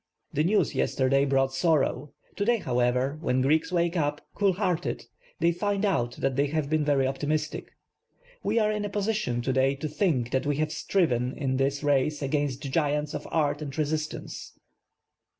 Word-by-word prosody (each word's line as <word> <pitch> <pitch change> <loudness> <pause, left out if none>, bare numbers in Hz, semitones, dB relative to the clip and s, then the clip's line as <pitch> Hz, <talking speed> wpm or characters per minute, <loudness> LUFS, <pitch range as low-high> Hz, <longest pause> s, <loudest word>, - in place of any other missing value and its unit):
The 150 - +2
news 205 +6 +2
yesterday 135 +1 +2
brought 135 -1 +1
sorrow; 145 -1 +1 0.2
to 205 - -1
day, 235 +3 +3
however, 125 - 0
when 130 -5 +1
Greeks 155 +5 +2
wake 170 0 +1
up, 145 -3 0
cool 200 -2 +2
headed, 180 -3 -1 0.3
they 170 +1 +3
find 200 +3 -1
out 120 -12 0
that 135 +1 -1
they 140 +2 +2
have 150 0 -2
been 155 -1 +2
very 140 -2 +2
optimistic. 150 +3 -2 0.7
We - - -1
‚Ė†.\rc 215 -2 +2
in 210 - -2
a - - -3
position, 205 - -1
to 130 - 0
day, 135 +1 +2
to 145 +3 -4
think 145 - 0
that 130 +2 0
we 145 - +1
have 155 +2 -1
striven 125 -10 0
in 130 -3 -1
this 140 +2 0
race 145 +1 +1
against 140 -1 -1
giants 150 0 0
of - - -5
art 145 -2 0
and 140 -1 -6
resistance. 155 0 -3
145 Hz, 175 wpm, -27 LUFS, 135-170 Hz, 0.7 s, day